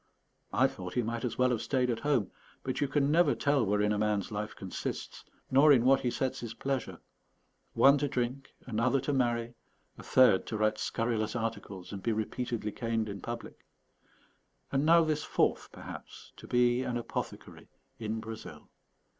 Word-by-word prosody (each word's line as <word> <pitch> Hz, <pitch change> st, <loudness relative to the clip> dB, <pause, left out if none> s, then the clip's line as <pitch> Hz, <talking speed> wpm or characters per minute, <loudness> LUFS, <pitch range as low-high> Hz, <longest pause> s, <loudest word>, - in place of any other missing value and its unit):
I -, -, +4 dB
thought 90 Hz, -1 st, -4 dB
he 125 Hz, -, +2 dB
might 115 Hz, +1 st, -3 dB
as 120 Hz, -3 st, -2 dB
well 125 Hz, 0 st, +3 dB
have 120 Hz, -, 0 dB
stayed 125 Hz, -3 st, +1 dB
at 115 Hz, -, -2 dB
home; 135 Hz, -9 st, +1 dB, 0.3 s
but 130 Hz, +2 st, -3 dB
you 145 Hz, -, +2 dB
never 150 Hz, +5 st, +4 dB
can -, -, -9 dB
tell 140 Hz, -3 st, +3 dB
wherein 105 Hz, 0 st, +1 dB
a 105 Hz, -, 0 dB
man's 105 Hz, -1 st, 0 dB
life 105 Hz, 0 st, -4 dB
consists, 95 Hz, -2 st, -5 dB, 0.3 s
nor 140 Hz, +3 st, +7 dB
in 125 Hz, -4 st, +5 dB
what 135 Hz, +1 st, +6 dB
he 125 Hz, -, 0 dB
sets 130 Hz, +2 st, -2 dB
his 115 Hz, -2 st, -6 dB
pleasure: 135 Hz, -1 st, -3 dB, 0.8 s
one 140 Hz, +1 st, +6 dB
to 145 Hz, -, 0 dB
drink, 130 Hz, 0 st, -3 dB
another 125 Hz, +3 st, +1 dB
to 140 Hz, +2 st, -2 dB
marry, 120 Hz, -2 st, 0 dB, 0.5 s
a -, -, -9 dB
third 125 Hz, -7 st, +4 dB
to 110 Hz, -, -3 dB
write 110 Hz, 0 st, +1 dB
scurrilous 115 Hz, -1 st, -1 dB
articles 110 Hz, -5 st, -4 dB
and 100 Hz, -, -6 dB
be 115 Hz, -, 0 dB
repeatedly 110 Hz, 0 st, -3 dB
caned 115 Hz, -1 st, -2 dB
in 100 Hz, -1 st, -6 dB
public, 120 Hz, 0 st, -7 dB, 1.1 s
and 140 Hz, +2 st, +1 dB
now 165 Hz, 0 st, +7 dB
this 155 Hz, -1 st, 0 dB
fourth, -, -, 0 dB
perhaps, -, -, -10 dB
to -, -, -11 dB
be 125 Hz, 0 st, +3 dB
an 125 Hz, -2 st, -2 dB
apothecary 120 Hz, -, -6 dB, 0.3 s
in 110 Hz, 0 st, -3 dB
Brazil. 110 Hz, 0 st, -9 dB
120 Hz, 175 wpm, -30 LUFS, 110-135 Hz, 1.1 s, nor